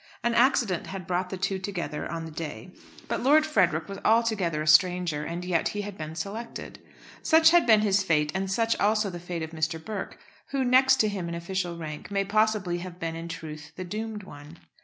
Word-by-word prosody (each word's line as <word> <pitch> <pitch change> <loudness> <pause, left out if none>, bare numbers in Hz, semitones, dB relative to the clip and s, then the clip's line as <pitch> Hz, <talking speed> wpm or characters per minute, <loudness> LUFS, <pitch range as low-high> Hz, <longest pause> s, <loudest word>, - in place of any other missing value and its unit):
An 235 - +1
accident 235 - +2
had 190 -2 -6
brought 180 +1 -1
the 190 - -5
two 195 +1 -1
together 180 -7 -4
on 165 -1 -4
the 160 - -8
day, 160 +3 -7 0.4
but - - -2
Lord 300 +4 +5
Frederick 170 - +1
was 195 0 -7
altogether 215 -9 +2
a - - -7
stranger, 160 -1 +4
and 170 +3 -5
yet 175 -2 +1
he 205 - -3
had 205 -1 -7
been 155 -2 -7
selected. 205 +8 -6 0.4
Such 320 0 +6
had 345 -6 +5
been 220 -2 +6
his 200 -1 +3
fate, 150 -5 +1
and 190 0 -2
such 230 +3 +1
also 215 -1 +2
the 175 - -7
fate 175 -1 -5
of 160 - -6
Mr. 160 0 -1
Burke, 200 +4 -6 0.3
who, 270 -2 -1
next 260 +1 +5
to 215 - +2
him 190 -5 -3
in 170 - -4
official 175 0 -3
rank, 155 -2 -7
may 195 -1 0
possibly 210 -4 +1
have 180 0 -8
been 165 0 -3
in 165 +1 -6
truth 155 -2 -8
the 185 - -5
doomed 215 +2 -5
one. 145 -1 -12
185 Hz, 210 wpm, -27 LUFS, 165-215 Hz, 0.4 s, Such